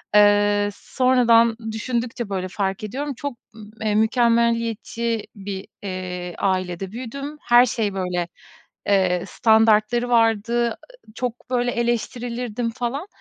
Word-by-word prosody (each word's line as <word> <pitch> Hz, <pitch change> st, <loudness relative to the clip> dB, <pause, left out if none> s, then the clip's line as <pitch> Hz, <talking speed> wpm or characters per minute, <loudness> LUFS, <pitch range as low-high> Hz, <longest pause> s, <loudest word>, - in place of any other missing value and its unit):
eee, 205 Hz, 0 st, +5 dB
sonradan 235 Hz, -1 st, +3 dB
düşündükçe, 235 Hz, 0 st, -3 dB
böyle, 185 Hz, -2 st, -2 dB
fark 190 Hz, +1 st, -3 dB
ediyorum 275 Hz, +7 st, -3 dB
çok, 280 Hz, -1 st, -5 dB, 0.2 s
ımm, 215 Hz, -1 st, -12 dB
eee, 215 Hz, -1 st, 0 dB
mükemmeliyetçi 230 Hz, 0 st, +1 dB
bir, 195 Hz, -1 st, -6 dB, 0.2 s
eee, 180 Hz, -2 st, -5 dB
ailede 185 Hz, -1 st, -1 dB
büyüdüm. 275 Hz, +6 st, -6 dB
Her 240 Hz, +1 st, +6 dB
şey, 220 Hz, -4 st, -1 dB
böyle, 180 Hz, -2 st, -2 dB, 0.6 s
eee, 185 Hz, -3 st, +2 dB
standartları 220 Hz, +2 st, +3 dB
vardı, 230 Hz, 0 st, +2 dB, 0.4 s
çok, 245 Hz, 0 st, -5 dB
böyle, 245 Hz, -1 st, +1 dB
eleştirilirdim 240 Hz, 0 st, -2 dB
falan. 250 Hz, -, -3 dB
225 Hz, 110 wpm, -22 LUFS, 205-240 Hz, 0.6 s, Her